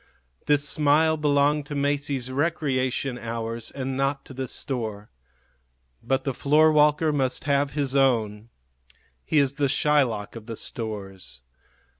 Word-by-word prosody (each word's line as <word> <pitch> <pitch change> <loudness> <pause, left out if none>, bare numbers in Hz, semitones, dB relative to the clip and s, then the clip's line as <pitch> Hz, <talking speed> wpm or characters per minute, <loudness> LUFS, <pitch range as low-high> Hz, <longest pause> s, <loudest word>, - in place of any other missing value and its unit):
This 145 0 +3
smile 155 +2 +3
belonged 145 -1 +1
to 145 - -5
Masie's 140 -2 -1
recreation 135 -4 -1
hours 115 0 -4
and 135 -1 -4
not 135 +1 -1
to - - -11
the 130 0 -4
store; 110 -8 -4 0.9
but 135 0 -1
the 135 - -2
floorwalker 150 +2 +3
must 130 -3 0
have 140 0 +1
his 140 -2 -1
own. 115 -5 +1 0.7
He 155 - -1
is 140 -1 +2
the 140 - +3
Shylock 130 -9 +1
of 115 -1 -10
the 115 - -5
stores. 95 - -7
135 Hz, 130 wpm, -25 LUFS, 120-145 Hz, 0.9 s, This